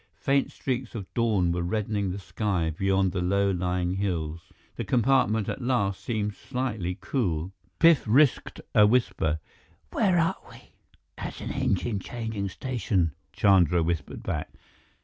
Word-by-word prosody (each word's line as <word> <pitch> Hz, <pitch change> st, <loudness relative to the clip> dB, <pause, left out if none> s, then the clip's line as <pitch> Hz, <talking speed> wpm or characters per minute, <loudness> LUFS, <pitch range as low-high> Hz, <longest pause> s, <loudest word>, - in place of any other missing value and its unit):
Faint 140 Hz, 0 st, +1 dB
streaks 130 Hz, -2 st, -3 dB
of 105 Hz, -4 st, -4 dB
dawn 105 Hz, -7 st, +2 dB
were 85 Hz, 0 st, -1 dB
reddening 100 Hz, +2 st, -1 dB
the 90 Hz, -, -3 dB
sky 95 Hz, -4 st, -1 dB
beyond 95 Hz, 0 st, +1 dB
low 100 Hz, +3 st, +1 dB
lying 90 Hz, 0 st, -1 dB
hills. 85 Hz, -5 st, -3 dB, 0.3 s
The -, -, -3 dB
compartment 120 Hz, -4 st, +2 dB
at -, -, -3 dB
last 115 Hz, -6 st, 0 dB
seemed 105 Hz, -3 st, -1 dB
slightly 110 Hz, -9 st, -3 dB
cool. 90 Hz, -, -1 dB, 0.3 s
Biff 165 Hz, -3 st, +6 dB
risked 135 Hz, +5 st, +3 dB
a 105 Hz, 0 st, +7 dB
whisper. 105 Hz, -9 st, +1 dB, 0.5 s
"Where 190 Hz, -5 st, +2 dB
are 165 Hz, -1 st, +2 dB
we?" -, -, -15 dB, 0.5 s
"At -, -, -5 dB
an -, -, -5 dB
engine 100 Hz, +2 st, 0 dB
changing 110 Hz, -2 st, -4 dB
station," 100 Hz, -6 st, -1 dB, 0.2 s
Chandra 90 Hz, -4 st, +4 dB
whispered 80 Hz, -3 st, -3 dB
back. -, -, -3 dB
100 Hz, 135 wpm, -27 LUFS, 90-120 Hz, 0.5 s, a